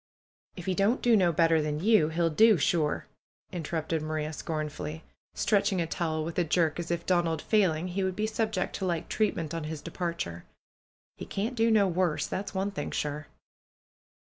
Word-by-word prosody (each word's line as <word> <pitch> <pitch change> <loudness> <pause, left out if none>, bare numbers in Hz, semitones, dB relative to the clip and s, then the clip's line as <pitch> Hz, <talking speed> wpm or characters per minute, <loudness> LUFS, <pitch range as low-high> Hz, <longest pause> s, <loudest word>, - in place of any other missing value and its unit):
"If 180 - -8
he 190 - 0
don't 200 +7 +2
do 240 -2 +4
no 180 -4 +4
better 165 0 +3
than 150 0 -2
you, 195 -4 +4
he'll 165 +1 +1
do 220 +5 +6
sure 155 0 +1 0.2
!" - - -47
interrupted 160 -2 -2
Maria, 155 0 -3
scornfully, 155 0 -4 0.3
stretching 200 -3 +2
a 170 - +1
towel 160 -1 -2
with 170 +2 -3
a - - +4
jerk 165 0 +1
as 170 - -4
if, 170 0 -2
Donald 170 -3 +1
failing, 180 -4 +1
he 190 +2 -1
would 190 -1 -1
be 215 - 0
subjected 215 -3 -1
to 190 - -1
like 170 -3 -2
treatment 170 -8 0
on 165 -2 -3
his 155 0 -5
departure. 170 - -4 0.7
"He - - -7
can't 215 +6 -2
do 230 -1 +2
no 210 -3 +4
worse. 175 -3 0
That's 200 +1 -4
one 195 +2 0
thing 145 -7 -4
sure." 150 0 -3
170 Hz, 185 wpm, -29 LUFS, 155-195 Hz, 0.7 s, do